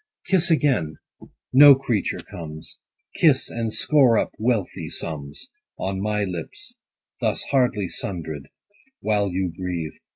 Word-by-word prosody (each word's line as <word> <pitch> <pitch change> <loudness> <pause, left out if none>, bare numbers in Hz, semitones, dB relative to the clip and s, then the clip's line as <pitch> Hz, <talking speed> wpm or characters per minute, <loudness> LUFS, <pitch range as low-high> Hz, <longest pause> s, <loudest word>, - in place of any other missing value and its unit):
Kiss 180 -2 +3
again: 130 - +1 0.6
no 140 +1 +9
creature 125 -6 -1
comes. 80 -2 -9 0.3
Kiss, 145 -5 +3
and 115 -1 -3
score 130 -3 +4
up - - 0
wealthy 105 -8 -1
sums 75 - -6 0.3
On 95 0 -3
my 105 0 0
lips, 90 -4 -7 0.5
thus - - -1
hardly 125 -7 +2
sundred, 80 -7 -5 0.5
While 105 -2 +1
you 90 -1 -2
breathe. 90 -4 -4
100 Hz, 120 wpm, -23 LUFS, 85-125 Hz, 0.6 s, no